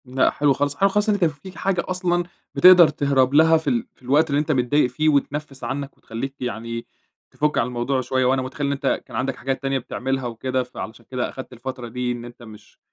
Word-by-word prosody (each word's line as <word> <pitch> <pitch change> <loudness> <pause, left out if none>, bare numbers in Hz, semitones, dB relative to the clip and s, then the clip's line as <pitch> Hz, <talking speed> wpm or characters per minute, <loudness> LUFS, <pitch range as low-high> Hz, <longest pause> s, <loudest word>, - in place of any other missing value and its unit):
لأ 130 +1 +2
حلو 145 -1 +2
خالص، 145 +1 -1
حلو 195 +6 +3
خالص 210 +2 +1
إن - - +4
أنت 195 -4 +2
فيك 165 +4 -5
حاجة 190 -3 0
أصلًا 180 -1 0 0.3
بتِقدر 180 -2 +8
تهرب 140 -3 +1
لها 160 +2 +6
في 160 - -2
ال 235 -1 0
في - - -31
الوقت 145 +5 +2
اللي 140 0 +2
أنت 155 - -1
متضايق 130 0 +2
فيه 155 +5 +1
وتنَفّس 140 -1 -1
عنّك 135 +3 -4
وتخلّيك 135 +5 -6
يعني 115 -1 -4 0.5
تفُك 150 0 0
عن 120 - +2
الموضوع 125 +2 -1
شوية، 130 0 0
وأنا 130 +1 +2
مُتخيل 130 +3 -3
إن - - 0
أنت 135 -1 -1
كان - - -11
عندك 135 +1 -1
حاجات 135 0 -3
تانية 135 -1 0
بتعملها 130 +1 -3
وكده 130 +2 -2
فعلشان 115 -2 -9
كده 125 -1 -1
أخدت 130 -1 -9
الفترة 125 0 -6
دي 125 +1 -2
إن 120 -1 -5
أنت 120 0 -12
مش 110 -2 -15
135 Hz, 220 wpm, -22 LUFS, 125-150 Hz, 0.5 s, بتِقدر